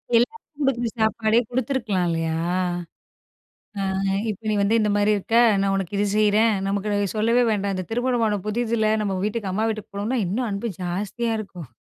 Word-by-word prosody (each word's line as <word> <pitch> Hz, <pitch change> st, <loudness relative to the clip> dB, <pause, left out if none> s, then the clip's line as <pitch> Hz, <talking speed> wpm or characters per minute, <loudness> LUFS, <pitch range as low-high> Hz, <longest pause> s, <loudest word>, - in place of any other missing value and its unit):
எல்லாருக்கும் 295 Hz, -, -1 dB
கொடுக்குற 240 Hz, -3 st, 0 dB
சாப்பாடே 220 Hz, +1 st, +2 dB
கொடுத்துருக்கலாம் 240 Hz, -7 st, -1 dB
இல்லையா? 165 Hz, -1 st, -1 dB, 1.4 s
ஆ, -, -, -1 dB, 0.5 s
இப்போ 210 Hz, +2 st, -7 dB
"நீ -, -, +1 dB
வந்து 220 Hz, +3 st, +3 dB
இந்த 210 Hz, -1 st, +1 dB
மாதிரி 205 Hz, +1 st, +3 dB
இருக்க. 225 Hz, +4 st, -1 dB, 0.2 s
நான் 195 Hz, 0 st, +1 dB
உனக்கு 195 Hz, +1 st, -3 dB
இது 205 Hz, -, +2 dB
செய்றேன்." 215 Hz, +1 st, +4 dB
நமக்கு 205 Hz, 0 st, 0 dB
சொல்லவே 230 Hz, +3 st, +3 dB
வேண்டாம். 200 Hz, -1 st, -1 dB
இந்த 185 Hz, -, -3 dB
திருமணம் 230 Hz, -5 st, 0 dB
புதிதுல 220 Hz, -1 st, +1 dB
நம்ம 195 Hz, -2 st, -1 dB
வீட்டுக்கு 210 Hz, -3 st, -2 dB
அம்மா 220 Hz, +3 st, 0 dB
வீட்டுக்கு 215 Hz, -2 st, -6 dB
போணோம்னா 220 Hz, +6 st, -1 dB
இன்னும் 230 Hz, +6 st, -1 dB
அன்பு 200 Hz, +3 st, -3 dB
ஜாஸ்தியா 205 Hz, +6 st, -2 dB
இருக்கும். 180 Hz, -, -8 dB
215 Hz, 155 wpm, -23 LUFS, 200-230 Hz, 1.4 s, செய்றேன்